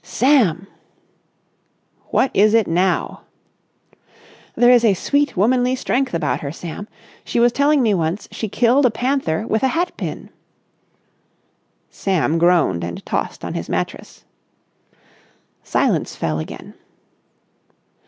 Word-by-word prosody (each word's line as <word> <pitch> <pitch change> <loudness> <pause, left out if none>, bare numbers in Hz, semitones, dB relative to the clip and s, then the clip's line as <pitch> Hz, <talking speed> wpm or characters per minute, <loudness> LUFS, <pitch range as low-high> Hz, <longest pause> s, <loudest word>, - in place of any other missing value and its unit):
"Sam!" 195 - +2 1.4
"What 270 - +1
is 215 +3 +4
it 225 -2 +3
now?" 180 +2 0 1.3
"There 245 0 +5
is 245 -1 +5
a 210 -4 +4
sweet 285 +5 0
womanly 250 +5 +2
strength 260 -4 -1
about 165 - -1
her, 140 - -4
Sam. 170 +5 -8 0.4
She - - -2
was 240 +1 +4
telling 285 +1 +2
me 220 - +2
she - - +2
once 170 +2 -2 0.2
killed 250 +4 +3
a - - +1
panther 230 - -1
with 220 -1 -1
a 265 - +3
hat 340 +6 -1
pin." - - -6 1.6
Sam 165 -4 0
groaned 165 - +2
and 85 0 -6
tossed - - -3
on - - -5
his - - -5
mattress. - - -5 1.4
Silence - - 0
fell 80 -1 -2
again. 80 - -8
215 Hz, 125 wpm, -19 LUFS, 170-255 Hz, 1.6 s, There